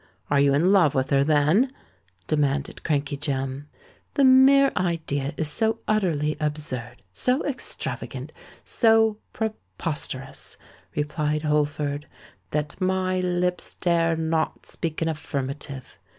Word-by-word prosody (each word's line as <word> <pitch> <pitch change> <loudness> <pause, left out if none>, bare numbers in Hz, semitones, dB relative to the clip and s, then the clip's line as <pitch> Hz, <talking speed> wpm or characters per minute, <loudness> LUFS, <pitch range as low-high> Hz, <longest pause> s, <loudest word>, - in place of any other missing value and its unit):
Are 145 - +4
you 140 0 +4
in 170 +6 +3
love 175 -8 +4
with 130 0 0
her, 140 0 +4
then?" 155 - +3 0.5
demanded 145 0 0
Crankey 145 -2 -1
Jem. 135 0 -3 0.5
"The 280 - +3
mere 270 +1 +7
idea 160 -5 -1
is 160 - -1
so 220 +5 +1
utterly 165 -8 +1
absurd—so 145 - -2
extravagant—so 225 -5 0
preposterous," 165 - -5 0.4
replied 150 0 -1
Holford, 150 -1 0 0.4
"that 150 +4 -3
my 185 0 +1
lips 180 0 -1
dare 165 -2 +2
not 160 0 -1
speak 165 -1 -3
an - - 0
affirmative. 140 -3 -5
155 Hz, 105 wpm, -25 LUFS, 145-185 Hz, 0.5 s, mere